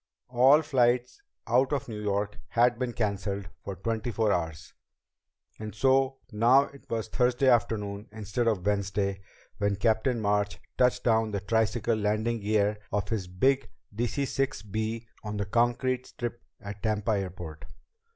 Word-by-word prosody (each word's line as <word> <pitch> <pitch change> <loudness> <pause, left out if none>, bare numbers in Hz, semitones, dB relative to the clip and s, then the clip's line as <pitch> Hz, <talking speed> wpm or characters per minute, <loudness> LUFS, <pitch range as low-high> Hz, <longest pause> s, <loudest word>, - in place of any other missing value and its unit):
All 130 +5 +6
flights 125 - +1 0.2
out 125 +4 +3
of 140 -3 -1
New 110 -3 -6
York 105 0 -1
had 120 0 +3
been 125 -2 -1
canceled 100 -4 -2
for 100 - -5
twenty 110 +5 -2
four 110 -2 +1
hours, 80 -4 -3 0.9
and 110 -1 -6
so 135 +2 +3
now 120 +6 +5
it 140 -1 -13
was 115 -1 -2
Thursday 125 +3 +2
afternoon, 105 -4 +1
instead 110 +2 -2
of 105 -6 0
Wednesday, 100 -1 0 0.4
when 100 0 +1
Captain 110 +4 +1
March 105 -1 0 0.2
touched 125 0 +2
down 110 -1 +3
the 100 -1 -2
tricycle 110 +2 +1
landing 110 +2 0
gear 105 0 +1
of 105 0 -1
his 105 -5 -2
big 130 +10 +1 0.3
DC 120 +5 -1
6 135 -7 -1
B 110 +2 -3 0.2
on 105 -1 -4
the 100 - -1
concrete 120 +4 +1
strip 120 0 -5 0.2
at 100 0 -8
Tampa 110 -1 0
airport. 90 -6 -4
110 Hz, 150 wpm, -28 LUFS, 100-120 Hz, 0.9 s, All